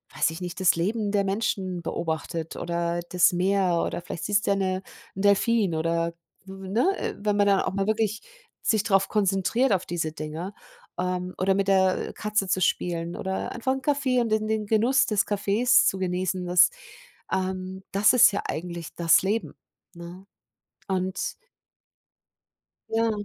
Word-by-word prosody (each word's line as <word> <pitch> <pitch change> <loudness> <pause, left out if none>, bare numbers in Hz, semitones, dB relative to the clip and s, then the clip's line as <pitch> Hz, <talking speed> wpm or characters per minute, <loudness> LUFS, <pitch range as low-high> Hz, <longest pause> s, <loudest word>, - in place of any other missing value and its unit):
weiß 160 - +2
ich 165 - -8
nicht, 180 +1 -5
das 185 - +4
Leben 205 +5 -1
der 200 -1 +2
Menschen 195 -3 -2
beobachtet 160 0 -4
oder 170 0 -2
das 180 0 +4
Meer 185 -1 +1
oder - - -4
vielleicht 175 - -6
siehst 205 0 +1
du - - +3
ja - - +3
'ne 185 -1 -1 0.3
'n 195 - -4
Delphin 205 -2 +3
oder, 165 +1 0 0.3
ne? 195 - -1
Wenn 205 0 0
man 205 - +4
dann 195 -1 +4
auch - - -2
mal 195 0 0
wirklich 220 0 0 0.4
sich 220 -3 +2
drauf 195 -3 +2
konzentriert 205 +5 +1
auf 185 -1 0
diese 165 -2 -2
Dinger, 160 +5 -6 0.4
ähm, 180 0 -2
oder 190 +1 +2
mit 195 0 0
der 190 -1 +2
Katze 210 -2 -1
zu 185 - +1
spielen 170 0 -1
oder 190 0 -3
einfach 260 +2 -1
'n 265 - -4
Kaffee 280 -3 +1
und 230 - -1
den 215 0 0
den 220 -1 -1
Genuss 230 +6 +3
des 210 -2 +1
Kaffees 205 +4 +3
zu 190 - +1
genießen, 185 0 -1
das, 180 0 +5 0.6
ähm, 190 0 -3
das 200 +4 +4
ist 245 -4 +7
ja 200 - -2
eigentlich 170 0 -5
das 165 -1 +4
Leben, 210 +4 -2 0.4
ne? 175 +2 -11 0.6
Und 190 0 -2 1.6
Ja, 225 0 +2
190 Hz, 165 wpm, -25 LUFS, 180-210 Hz, 1.6 s, ist